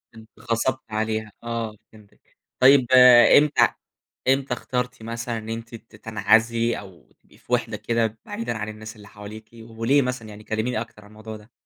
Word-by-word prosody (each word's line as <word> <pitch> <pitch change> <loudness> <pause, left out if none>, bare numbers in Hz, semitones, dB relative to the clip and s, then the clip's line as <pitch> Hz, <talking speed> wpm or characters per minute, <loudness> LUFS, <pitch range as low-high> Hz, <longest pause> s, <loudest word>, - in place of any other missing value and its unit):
اتغصبتي 115 +3 -3
عليها، 110 0 -3
آه 115 -2 -4 0.2
فهمتِك، 105 -2 -22 0.2
طيب 130 0 +6 0.5
إمتى 150 0 +4 0.6
إمتى 135 0 +1
اخترتِ 125 -1 -4
مثلًا 115 +1 -4
إن 110 0 -8
أنتِ 115 +1 -6
ت 115 0 -15
تنعزلي 115 +2 +1
أو 95 -4 -15
تبقي - - -24
في - - -8
وحدة - - 0
كده 115 -2 -1
بعيدًا 115 0 -4
عن 105 0 -5
الناس 110 +1 -9
اللي 105 -2 -15
حواليكِ، 105 +2 -11
وليه 115 +4 0
مثلًا 125 -4 -4
يعني 105 0 -12
كلميني 110 +2 -2
أكتر 115 -2 -11
عن - - -16
الموضوع 110 +1 -10
ده؟ 105 +2 -19
115 Hz, 160 wpm, -23 LUFS, 110-120 Hz, 0.6 s, طيب